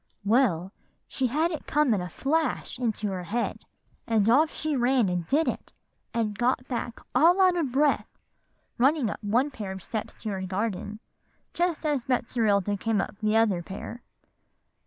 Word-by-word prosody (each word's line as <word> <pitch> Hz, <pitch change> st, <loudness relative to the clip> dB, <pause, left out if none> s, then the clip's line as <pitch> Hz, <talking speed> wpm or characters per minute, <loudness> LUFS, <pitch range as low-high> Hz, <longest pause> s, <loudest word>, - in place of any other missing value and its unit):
"Well, 200 Hz, -6 st, +2 dB, 0.4 s
she 260 Hz, -, -1 dB
had 310 Hz, +7 st, +1 dB
it 315 Hz, -, -6 dB
come 295 Hz, -5 st, +3 dB
in 200 Hz, -, 0 dB
a 180 Hz, -, -5 dB
flash 310 Hz, -, -1 dB
into 220 Hz, -4 st, -1 dB
her 185 Hz, -1 st, -3 dB
head; 235 Hz, +6 st, -2 dB, 0.4 s
and 220 Hz, -3 st, +2 dB
off 295 Hz, +7 st, +4 dB
she 310 Hz, -1 st, -2 dB
ran 250 Hz, -3 st, +3 dB
and 175 Hz, -2 st, -2 dB
did 310 Hz, +4 st, +2 dB
it, -, -, -3 dB, 0.4 s
and 220 Hz, -3 st, -1 dB
got 250 Hz, +3 st, 0 dB
back 240 Hz, -1 st, -4 dB
all 335 Hz, +9 st, +5 dB
out 370 Hz, -2 st, +5 dB
of 315 Hz, -7 st, -1 dB
breath, 285 Hz, +3 st, +1 dB, 0.6 s
running 270 Hz, -3 st, +3 dB
up -, -, -8 dB
one 245 Hz, +8 st, +1 dB
pair 205 Hz, -7 st, -6 dB
of 190 Hz, -2 st, -7 dB
steps 220 Hz, -2 st, -5 dB
to 220 Hz, -, -2 dB
her 195 Hz, -2 st, -3 dB
garden, 205 Hz, +2 st, -3 dB, 0.5 s
just 345 Hz, -2 st, -1 dB
as 290 Hz, -5 st, 0 dB
Betserilda 215 Hz, -5 st, +1 dB
came 220 Hz, +1 st, 0 dB
up 200 Hz, +1 st, -4 dB
the 215 Hz, 0 st, +2 dB
other 210 Hz, -6 st, +3 dB
pair. 195 Hz, +7 st, -8 dB
235 Hz, 170 wpm, -27 LUFS, 205-275 Hz, 0.6 s, all